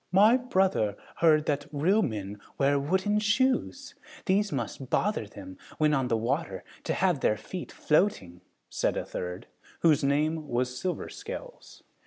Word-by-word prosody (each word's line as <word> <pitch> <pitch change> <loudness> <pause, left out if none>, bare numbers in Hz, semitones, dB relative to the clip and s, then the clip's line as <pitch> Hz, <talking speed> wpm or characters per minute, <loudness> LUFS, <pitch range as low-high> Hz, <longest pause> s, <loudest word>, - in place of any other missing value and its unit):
"My 210 +6 +6
brother 190 - +1 0.2
heard 155 -2 +4
that 145 -1 -1
real 175 +9 +2
men 105 - -3 0.2
wear 140 0 +3
wooden 190 +8 +1
shoes! 260 +5 0 0.3
These 200 +1 +2
must 130 0 -4
bother 205 - 0
them, 95 -2 -11 0.2
when 155 -1 +3
on 135 -3 +1
the 115 - +1
water, 135 +9 -2 0.2
to - - 0
have 180 -5 +2
their 105 - +2
feet 180 - -7
floating," 125 - 0 0.3
said - - -1
a - - -2
third, 90 0 -5 0.4
whose 155 -5 +4
name 150 +3 +1
was 125 +1 -1
Silver 180 +7 -3
Scales. - - -9
155 Hz, 150 wpm, -28 LUFS, 125-200 Hz, 0.4 s, My